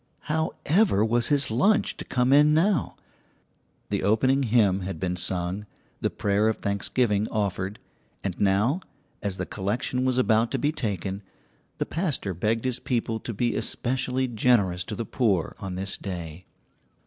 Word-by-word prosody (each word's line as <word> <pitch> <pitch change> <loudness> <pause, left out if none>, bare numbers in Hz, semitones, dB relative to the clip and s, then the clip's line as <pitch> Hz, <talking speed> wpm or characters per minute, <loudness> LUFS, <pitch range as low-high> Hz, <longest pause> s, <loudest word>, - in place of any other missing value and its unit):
How 160 +1 -1
ever 160 - +4
was 120 +1 +2
his 140 -5 +2
lunch 195 - +2
to - - -6
come 125 +1 +2
in 150 +1 +6
now? 175 -1 +2 1.0
The - - 0
opening 130 +6 +3
hymn 110 -6 +3
had 95 -3 -5
been 90 +1 -1
sung, 90 +3 -2 0.3
the - - 0
prayer 100 +2 +1
of 110 - -1
thanksgiving 105 +1 0
offered, 100 -1 -2 0.5
and 95 -3 -3
now, 105 - +2 0.4
as 100 -2 -2
the - - -2
collection 110 +6 -2
was 130 -1 +1
about 115 -2 +3
to - - +2
be 145 - +1
taken, 100 - -3 0.6
the - - -1
pastor 150 - -2
begged 110 +7 -1
his 125 -2 0
people 120 -4 -1
to 120 - -5
be 120 +3 0
especially 130 +1 -1
generous 105 -7 +2
to - - -5
the 115 - -4
poor 105 - 0
on 95 -3 -5
this 95 +2 -2
day. 85 -2 -6
110 Hz, 160 wpm, -26 LUFS, 95-130 Hz, 1.0 s, in